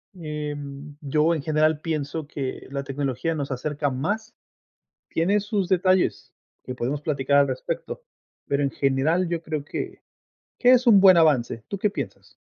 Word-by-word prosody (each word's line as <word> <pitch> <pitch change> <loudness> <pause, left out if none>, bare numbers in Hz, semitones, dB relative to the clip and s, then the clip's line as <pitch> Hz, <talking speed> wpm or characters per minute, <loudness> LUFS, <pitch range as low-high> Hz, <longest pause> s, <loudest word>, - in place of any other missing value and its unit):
Em, 150 -3 -6
yo 155 +3 +2
en 155 - -3
general, 155 0 +2
pienso 155 -1 -3
que 140 -3 -5
la 140 0 -3
tecnología 140 +3 -2
nos 140 -2 -4
acerca 145 +2 -2
más. 205 - -3 0.8
Tiene 195 +6 +1
sus 205 -2 -1
detalles, 185 0 +1 0.3
que 125 - -5
podemos 130 +4 -2
platicar 140 -2 +1
al 140 -1 +4
respecto. 130 -1 -4 0.4
Pero 140 0 0
en 140 - +1
general, 145 +7 +1
yo 170 -1 -2
creo 155 -3 -4
que - - -6 0.6
que 250 - +5
es 250 0 +3
un 210 -4 +8
buen 190 -1 +8
avance. 140 -9 +3
¿Tú 200 - -3
qué 210 +2 +1
piensas? 205 - -7
150 Hz, 160 wpm, -24 LUFS, 140-175 Hz, 0.8 s, un